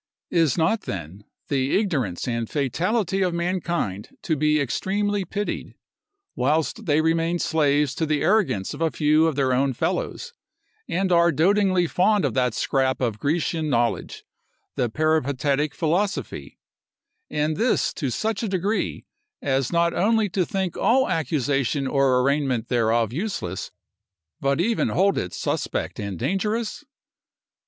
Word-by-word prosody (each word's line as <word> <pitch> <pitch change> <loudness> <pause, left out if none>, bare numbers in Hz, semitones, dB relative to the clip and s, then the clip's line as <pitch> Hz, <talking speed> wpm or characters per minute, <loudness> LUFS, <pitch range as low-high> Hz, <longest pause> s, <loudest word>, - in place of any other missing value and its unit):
Is 165 -3 +2
not, 175 +7 +2
then, 95 +3 -6 0.2
the 135 -1 +1
ignorance 140 - -1
and 115 -2 -2
fatality 180 - 0
of 180 -2 +1
mankind 170 - -2
to 160 - 0
be 150 +1 +2
extremely 200 - -1
pitied, 205 +4 -4 0.6
whilst 160 - 0
they 150 0 +3
remain 165 +1 +1
slaves 150 -4 +1
to 160 +2 -2
the 150 -1 0
arrogance 130 - +1
of 145 - -8
a 165 - +3
few 155 +1 +3
of 160 - -1
their 135 -2 +1
own 135 +1 +1
fellows, 485 - -3 0.6
and 185 +1 0
are 170 0 +5
dotingly 185 +3 +3
fond 195 +2 +2
of 130 - -1
that 125 -3 +1
scrap 130 -1 0
of 115 -4 -1
Grecian 160 +1 -1
knowledge, 120 -3 -1 0.5
the 120 - 0
Peripatetic 145 0 0
philosophy; 165 - -2 0.7
and 150 +1 0
this 235 +1 +1
to 140 -6 -3
such 215 - -2
a 225 - -1
degree, 195 +3 -1 0.3
as 135 -2 0
not 170 0 +2
only 220 +1 +2
to 180 -1 0
think 190 -3 -2
all 260 +6 +3
accusation 140 -3 0
or 135 -2 +3
arraignment 135 -3 0
thereof 115 -2 +1
useless, 145 - -3 0.7
but 140 +2 0
even 225 +6 +1
hold 195 +2 +2
it 90 - -4
suspect - - -3
and 100 -3 -4
dangerous? 210 - -2
155 Hz, 140 wpm, -24 LUFS, 130-185 Hz, 0.7 s, are